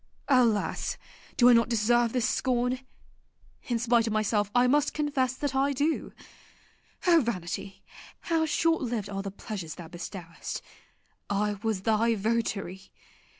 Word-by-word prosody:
Alas! 240 -6 +2 0.4
do 245 - +6
I 250 - +8
not 230 0 +4
deserve 235 +1 +2
this 245 -2 +1
scorn? 250 0 0 0.9
In 240 -3 0
spite 230 0 +2
of 220 - -1
myself 210 -1 +1
I 245 0 +5
must 290 +3 +2
confess 275 -4 0
that 285 0 -2
I 275 +1 +2
do. 295 +4 -1 0.9
O 340 -3 +6
vanity, 195 -4 -4 0.4
how 325 -1 +1
short 325 +1 +2
lived 230 -6 -3
are 195 0 -3
the 195 - -4
pleasures 190 -5 -6
thou 165 -1 -10
bestowest! 175 -1 -7 0.7
I 205 0 0
was 220 -4 -1
thy 225 +1 +2
votary. 200 -3 -2
230 Hz, 140 wpm, -28 LUFS, 205-255 Hz, 0.9 s, I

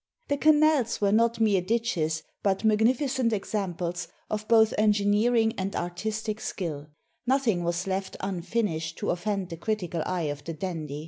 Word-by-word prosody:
The 285 - +1
canals 300 -5 +4
were 200 -1 +2
not 230 +2 +3
mere 210 -4 +3
ditches, 180 -7 -1 0.2
but 195 +1 0
magnificent 235 +3 +2
examples 180 -4 -3 0.2
of 215 0 -3
both 220 -1 +5
engineering 215 +2 +3
and 195 +1 -2
artis 210 +5 -3
tic 215 -1 -3
skill 155 -9 -4 0.2
— - - -44
nothing 245 -9 +2
was 170 +1 -1
left 190 0 -3
unfinished 175 -3 -2
to - - -1
offend 190 +1 -2
the 165 - -6
critical 180 -4 -2
eye 180 -2 -1
of 145 0 -13
the 165 - -5
dandy. 155 -4 -4
205 Hz, 155 wpm, -27 LUFS, 175-225 Hz, 0.2 s, both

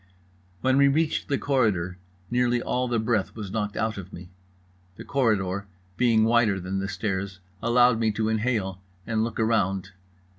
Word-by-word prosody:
When 130 0 +3
we 140 0 +6
reached 155 +3 +1
the 140 - +1
corridor 100 -11 0 0.3
nearly 120 0 +2
all 125 +1 -1
the 120 -1 0
breath 110 -3 0
was 105 -4 -6
knocked 105 -1 -2
out 110 -2 -1
of 95 0 -9
me. 90 +1 -10 0.6
The - - -9
corridor 100 -7 0 0.3
being 115 -2 +3
wider 115 -3 +3
than 95 +1 -3
the 95 - -2
stairs 95 -3 -3 0.2
allowed 120 0 +4
me 115 -1 +2
to 110 +1 -1
inhale 110 -4 -1 0.2
and 110 -1 0
look 115 0 -4
around. 100 -4 +1
110 Hz, 160 wpm, -26 LUFS, 95-120 Hz, 0.6 s, we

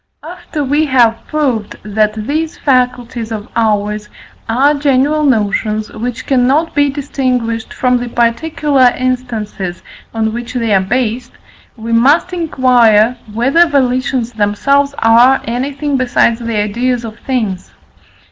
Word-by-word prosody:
After 320 -2 -6
we 290 +3 +1
have 240 -4 +2
proved, 260 -9 -1
that 215 0 0
these 315 +4 -2
faculties 245 -3 -1
of 215 -1 -5
ours 210 -2 -1 0.4
are 270 +6 +3
general 285 +1 +1
notions, 215 -4 0
which 235 +2 -5
cannot 270 +5 +1
be 285 0 +2
distinguished 255 -5 -2
from 250 -1 +1
the 245 0 -5
particular 255 +2 +1
instances 230 -8 -3 0.3
on 220 -1 -1
which 240 +2 -6
they 230 -3 0
are 190 - +4
based, 240 +4 -2 0.4
we 230 +1 -6
must 285 +10 +3
inquire 250 -8 +3 0.2
whether 270 +10 +3
volitions 255 -4 0
themselves 275 +7 +1
are 240 +4 +5
anything 275 +4 -2
besides 240 -2 +1
the 230 -2 -3
ideas 235 +4 -1
of 220 0 -9
things. 215 -8 -3
245 Hz, 125 wpm, -14 LUFS, 225-275 Hz, 0.4 s, are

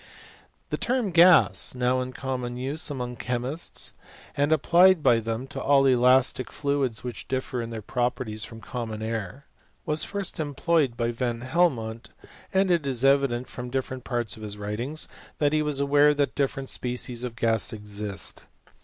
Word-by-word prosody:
The - - -2
term 240 -6 0
gas^ 170 -5 +5
now 125 +1 +1
in 130 0 -4
common 125 -2 -4
use 140 +6 -1
among 125 -4 -4
chemists, 125 +6 -2 0.4
and 145 +2 +1
applied 170 +2 +5
by 115 - +5
them 115 +2 -3
to 140 -2 -5
all 135 0 +4
elastic 130 -1 +3
fluids 140 -6 -1
which 125 -3 -6
differ 130 -1 -2
ia 115 - -4
their 115 -2 -7
properties 120 -2 -2
from 115 -1 -9
common 110 -3 -5
air, 115 +4 -4 0.4
was 150 +1 0
first 200 -4 -4
employed 145 -3 0
by 120 0 0
Van 120 -1 -2
Helmont: 125 -6 0 0.4
and 190 -1 +2
it 165 -5 +1
is 130 -1 +1
evident, 135 -3 +2
from 125 0 -7
different^ 130 0 -3
parts 120 -5 -2
of 110 - -13
his 105 -1 -6
writings, 115 +9 -3 0.3
that 145 0 +1
he 155 - +3
was 150 -2 0
aware 145 +1 +4
that 145 -1 0
difFereotL 135 -1 -2
species 125 -1 -2
of 120 -2 -5
gas 115 -2 +1
exist. 105 -4 -4
130 Hz, 160 wpm, -26 LUFS, 115-145 Hz, 0.4 s, gas^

